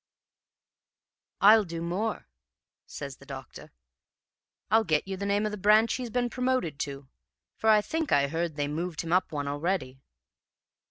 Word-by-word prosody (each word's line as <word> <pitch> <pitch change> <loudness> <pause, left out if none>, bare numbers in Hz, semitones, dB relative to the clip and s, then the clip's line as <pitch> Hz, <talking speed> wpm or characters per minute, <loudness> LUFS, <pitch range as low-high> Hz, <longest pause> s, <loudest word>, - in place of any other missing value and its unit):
"'I'll 215 +2 +7
do 165 -3 -6
more,' 185 +7 -3 0.6
says 140 -2 -7
the 140 - -16
doctor. 135 -3 -9 1.0
'I'll 220 +1 +5
get 155 -3 0
you 195 - -3
the 200 +1 -4
name 205 +1 +1
of 210 - -1
the 210 - -6
branch 215 +3 +4
he's 250 -2 -4
been 245 +1 0
promoted 250 - -1
to, 140 -1 -5 0.5
for 220 - 0
I 215 -1 +6
think 320 +7 -3
I 140 0 +4
heard 165 +1 -2
they'd 145 -1 -1
moved 165 +2 -3
him 165 0 -3
up 185 - +2
one 145 -2 -3
already.' 145 -3 -2
180 Hz, 160 wpm, -28 LUFS, 145-215 Hz, 1.0 s, I'll